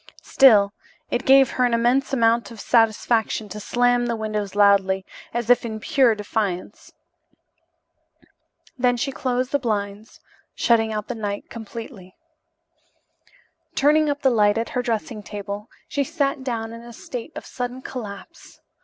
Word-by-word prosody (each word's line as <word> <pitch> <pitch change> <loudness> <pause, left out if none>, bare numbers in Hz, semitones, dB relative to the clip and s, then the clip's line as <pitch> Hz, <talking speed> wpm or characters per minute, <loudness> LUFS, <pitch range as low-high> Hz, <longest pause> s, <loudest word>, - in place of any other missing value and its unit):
Still, 210 -7 +5 0.4
it 245 - -2
gave 270 -1 +6
her 255 - 0
an 245 -1 +2
immense 245 +4 +1
amount 230 -2 +2
of 230 -2 -11
satisfaction 225 -1 +1
to 210 +3 -7
slam 245 +2 +1
the 235 - -1
windows 215 -3 -4
loudly, 195 -2 +3 0.3
as 240 -1 -3
if 245 - +4
in 220 -2 -5
pure 255 -1 +3
defiance. 205 -2 -4 1.9
Then 245 -1 +2
she 275 +3 -2
closed 255 -1 -2
the 285 - +1
blinds, 210 -2 -4 0.4
shutting 225 -2 +2
out 210 -1 -4
the - - -3
night 205 -3 -5
completely. 225 -4 -9 1.6
Turning 300 +2 +3
up 285 0 -3
the 265 - +4
light 210 -2 +3
at 230 - -2
her 250 - -1
dressing 235 0 -3
table, 205 +1 -7 0.2
she 285 - -1
sat 280 -3 -2
down 230 -3 -3
in 230 - -9
a 235 0 -12
state 245 +5 -8
of - - -7
sudden 250 +1 -5
collapse. 205 -6 -9
230 Hz, 145 wpm, -23 LUFS, 210-250 Hz, 1.9 s, gave